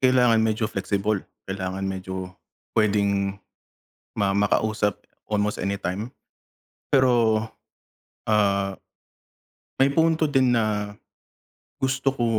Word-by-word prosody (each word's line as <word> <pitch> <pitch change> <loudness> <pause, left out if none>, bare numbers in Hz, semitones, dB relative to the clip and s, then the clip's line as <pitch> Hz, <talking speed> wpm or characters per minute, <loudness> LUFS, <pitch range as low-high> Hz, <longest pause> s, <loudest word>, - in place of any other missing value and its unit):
kailangan 125 -3 +4
medyo 110 0 +1
flexible, 100 +1 -1 0.2
kailangan 95 0 -4
medyo 95 -1 -4 0.4
puwedeng 100 -2 +1 0.8
ma 100 -1 +1
makausap 105 0 +1 0.3
almost 105 0 0
anytime. 100 +4 -3 0.8
Pero, 120 -5 +4 0.9
ah, 100 -2 +2 1.1
may 140 +1 +4
punto 160 0 +3
din 130 -4 +3
na 105 -2 -1 0.9
gusto 135 0 0
ko 120 - 0
105 Hz, 85 wpm, -24 LUFS, 100-120 Hz, 1.1 s, kailangan